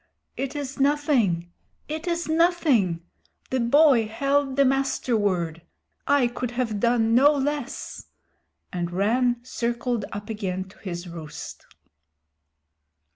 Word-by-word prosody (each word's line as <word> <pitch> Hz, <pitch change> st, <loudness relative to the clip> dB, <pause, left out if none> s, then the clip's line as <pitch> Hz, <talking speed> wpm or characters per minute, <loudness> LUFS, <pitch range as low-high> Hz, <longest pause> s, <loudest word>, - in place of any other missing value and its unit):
"It 275 Hz, +2 st, -4 dB
is 280 Hz, -2 st, -5 dB
nothing. 270 Hz, -, +2 dB, 0.4 s
It 315 Hz, +3 st, -5 dB
is 340 Hz, 0 st, -1 dB
nothing. 315 Hz, -, +2 dB, 0.5 s
The 260 Hz, -, +1 dB
boy 250 Hz, -1 st, +5 dB
held 275 Hz, +4 st, 0 dB
the 280 Hz, 0 st, +4 dB
Master 270 Hz, -2 st, +1 dB
Word. 175 Hz, -6 st, 0 dB, 0.5 s
I 285 Hz, -2 st, +4 dB
could 245 Hz, 0 st, -3 dB
have 240 Hz, -4 st, -2 dB
done 230 Hz, 0 st, +2 dB
no 275 Hz, +5 st, +6 dB
less," 290 Hz, -2 st, -3 dB, 0.7 s
and 175 Hz, -1 st, -2 dB
Rann 235 Hz, +7 st, +2 dB
circled 235 Hz, -2 st, -2 dB
up 205 Hz, +1 st, -6 dB
again 190 Hz, -4 st, -3 dB
to -, -, -19 dB
his 175 Hz, -2 st, -6 dB
roost. 165 Hz, -3 st, -9 dB
245 Hz, 120 wpm, -25 LUFS, 200-280 Hz, 0.7 s, no